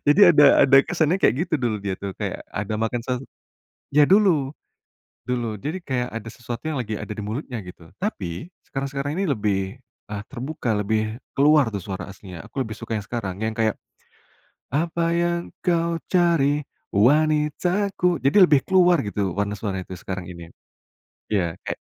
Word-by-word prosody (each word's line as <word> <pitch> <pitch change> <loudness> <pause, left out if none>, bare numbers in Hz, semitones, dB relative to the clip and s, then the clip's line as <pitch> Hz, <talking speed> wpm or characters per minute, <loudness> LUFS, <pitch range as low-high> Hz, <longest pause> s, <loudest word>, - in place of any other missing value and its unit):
Jadi 145 +6 +5
ada 150 -2 +6 0.2
ada 135 0 +6
kesannya 170 0 +2
kayak 125 - +4
gitu 165 - 0
dulu 120 -4 0
dia 100 -2 -3
tuh, 100 -1 -5
kayak, - - -5
ada 105 +2 -2
makan 115 +1 -1
sesuatu 125 +1 -3 0.7
ya 150 - +8
dulu, 175 -7 +4 0.7
dulu. 120 -3 -2
Jadi 150 - -4
kayak 125 -5 -2
ada 115 0 -5
sesuatu 120 0 -7
yang 150 - -2
lagi 110 -3 -3
ada - - -8
di 105 - -4
mulutnya 120 +3 -4
gitu. 90 -2 -12
Tapi, 95 - -4 0.2
sekarang-sekarang 140 +2 -3
ini 195 - +1
lebih, 105 -3 0 0.5
e - - -3 0.2
terbuka, 135 0 -4
lebih, 110 +2 -1 0.2
keluar 145 -5 +4
tuh 100 - -3
suara 95 +1 -5
aslinya. 95 -1 -10
Aku 135 +5 -4
lebih 110 -3 -5
suka 115 - -6
yang 105 - -1
sekarang, 100 -4 -4
yang 110 0 -1
kayak 110 -2 +2 1.0
apa 165 +4 0
yang 170 0 +1 0.2
kau 170 -1 +1
cari, 160 -5 +3 0.3
wanitaku 155 - +2
jadi 140 +9 +4
lebih 145 -5 +4
keluar 180 -4 +4
gitu 100 -3 -2
warna 100 0 -2
suaranya 95 -3 -3
tuh 90 - -6
sekarang 95 -2 -5
ini. 85 -1 -9 0.9
Iya, 85 -5 0
kayak - - -2
125 Hz, 165 wpm, -23 LUFS, 105-155 Hz, 1.0 s, ya